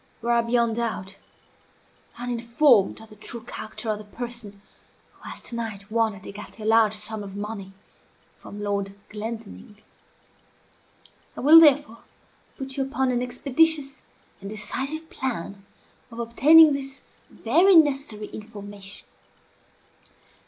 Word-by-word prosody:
You 235 - -2
are, 235 0 +4
beyond 235 -1 +1
doubt, 195 -5 -3 1.0
uninformed 240 -1 +2
of 220 - -14
the - - -12
true 225 +2 -5
character 225 0 -8
of 210 - -3
the - - -9
person 230 -2 -7 0.5
who - - -12
has - - -4
to 235 - -4
night 215 -3 -6
won 225 -2 +1
at 190 - -14
écarté 210 +2 -10
a - - -6
large 220 -1 +4
sum 215 0 -5
of 195 -1 -8
money 205 -2 -6 0.7
from 205 0 -9
Lord 200 -1 -2
Glendinning. 210 - -8 1.6
I - - -5
will 310 +5 +9
therefore 290 -7 +4 0.6
put 270 -1 -6
you 270 - +1
upon 265 -1 -1
an 245 -1 0
expeditious 275 +3 0 0.4
and 195 - -7
decisive 270 +9 -3
plan 200 -5 -5 0.4
of 230 - -12
obtaining 295 +7 +6
this 270 -1 -5 0.3
very 345 - +3
necessary 275 -9 +3
information. 205 -2 -9
230 Hz, 130 wpm, -24 LUFS, 210-265 Hz, 1.6 s, will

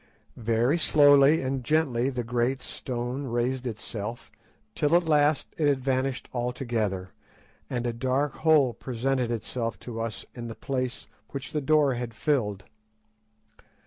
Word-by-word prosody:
Very 120 +7 +1
slowly 145 -1 +6
and 130 0 -2
gently 135 -4 +1
the 125 -2 -3
great 125 +2 0
stone 125 +2 -4
raised 125 +1 -1
itself, 110 0 -6 0.4
till 150 +2 +2
at 175 - +5
last 150 -2 +2
it 150 - +3
had 140 -2 +3
vanished 130 0 -1
altogether, 120 -6 -2 0.6
and 120 -1 -2
a 120 - -1
dark 130 +4 0
hole 150 -6 +4
presented 130 0 -1
itself 115 0 -3
to 115 -2 -5
us 115 -3 -4
in 120 -1 -6
the 115 - -7
place 130 -2 -3 0.2
which 140 0 -6
the 150 - -1
door 150 -1 +3
had 120 -2 -5
filled. 110 -11 0
130 Hz, 140 wpm, -27 LUFS, 120-140 Hz, 0.6 s, slowly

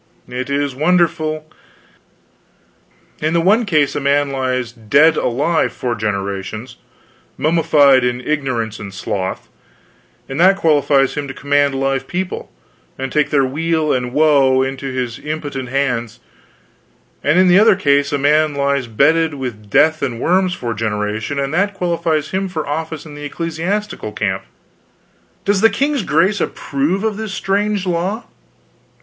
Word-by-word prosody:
It 125 +2 -5
is 140 -1 -1
wonderful. 155 0 +1 1.8
In 155 +2 0
the - - +4
one 210 +7 +3
case 150 -6 +2
a - - 0
man 140 0 +1
lies 130 -3 -2
dead 135 +8 +3
alive 160 +7 0
four 125 -1 -2
generations 105 +2 -4 0.6
mummified 145 -4 +4
in 125 0 0
ignorance 125 -6 -2
and 100 -1 -7
sloth 95 0 -4 0.8
and 135 +3 -5
that 190 +3 +6
qualifies 145 -5 +3
him 145 -1 -4
to 135 - -7
command 145 0 +1
live 135 0 -1
people, 180 +1 -4 0.5
and 135 0 -4
take 150 +1 +1
their 140 -3 +3
weal 160 +3 0
and 125 -1 -2
woe 140 -3 +4
into 135 +1 -4
his 125 -3 -3
impotent 145 -4 -5
hands; 120 -3 -1 1.0
and 150 +4 +3
in 185 0 +5
the 180 +2 +6
other 215 -1 +6
case, 140 -4 +2
a 145 - +1
man 150 +1 +2
lies 140 -2 0
bedded 160 +7 +2
with 115 -6 -6
death 155 +9 +3
and 125 -5 -2
worms 185 +4 +1
four 120 -1 -4
generations, 110 +4 -2
and 140 +1 -2
that 200 +3 +1
qualifies 170 -4 -1
him 190 0 -1
for 160 -4 -4
office 160 +1 -4
in 155 - -10
the 145 0 -7
celestial 175 +7 -3
camp. - - -2 1.0
Does 200 -1 +2
the 225 - +6
king's 275 +6 0
grace 185 +5 +1
approve 150 +9 -1
of 220 -2 -1
this 220 -3 -5
strange 200 0 0
law?" 185 +6 -1
145 Hz, 145 wpm, -18 LUFS, 130-170 Hz, 1.8 s, that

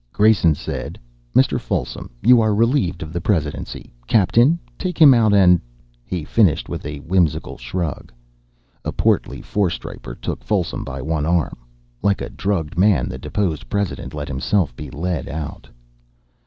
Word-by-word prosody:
Grayson 105 -7 +4
said: - - -5 0.4
"Mr. - - +4
Folsom, 60 0 -3
you 120 +1 +7
are 110 -2 +2
relieved 115 - +1
of 80 0 -9
the 85 - -2
presidency. 80 - -2
Captain, 115 - +4 0.2
take 185 -2 -3
him 145 -4 +9
out 115 -3 +4
and 90 -4 +5 0.2
" - - -35
He 90 +4 -4
finished 100 -7 +2
with - - -5
a 75 0 -5
whimsical 85 -2 0
shrug. 75 +5 -4 0.7
A - - -2
portly - - 0
four 100 -3 0
striper - - -7
took - - -5
Folsom - - -1
by 70 -1 -6
one 80 0 -1
arm. 85 -2 +1 0.5
Like 100 -1 +2
a - - -5
drugged 85 -5 -2
man 95 - +3
the 65 - -6
deposed 80 +1 -2
president 100 -10 -3
let 75 -1 -4
himself 70 - 0
be 75 +1 -8
led 80 +3 -3
out. 75 0 -6
85 Hz, 155 wpm, -21 LUFS, 75-105 Hz, 0.7 s, him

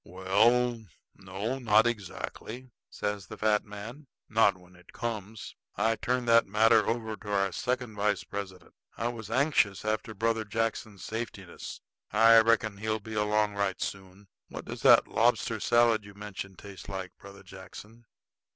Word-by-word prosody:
"Well, 110 +7 +2 0.3
no, 100 +7 -4
not 110 -2 +4
exactly," 120 +3 -5 0.2
says 105 -2 -4
the - - -9
fat 105 -1 +2
man, 110 +8 -9 0.2
"not 110 -4 +3
when 90 0 -19
it 90 - -19
comes. 110 -2 -5 0.2
I 110 +2 +2
turned 125 +1 -1
that 115 0 +5
matter 110 +1 +4
over 110 -2 -2
to 105 -1 -8
our 100 -1 +1
second 125 +4 -2
vice 105 -1 0
president. 95 -3 -7 0.2
I 115 - -1
was 115 -4 -7
anxious 120 -6 +2
after 110 +1 -2
Brother 115 +2 0
Jackson's 110 -2 -3
safetiness. 110 -5 -6 0.3
I 115 +2 +7
reckon 110 -2 +2
he'll 110 +1 -2
be 110 +1 -9
along 105 0 +1
right 100 -2 -1
soon. 95 +1 -6 0.2
What - - -8
does - - -7
that - - +7
lobster - - +1
salad 120 -2 +3
you 100 0 -13
mentioned 100 -2 -8
taste 100 -1 -11
like, 95 -2 -6
Brother 100 0 -13
Jackson?" 105 +5 -12
105 Hz, 150 wpm, -29 LUFS, 100-115 Hz, 0.3 s, I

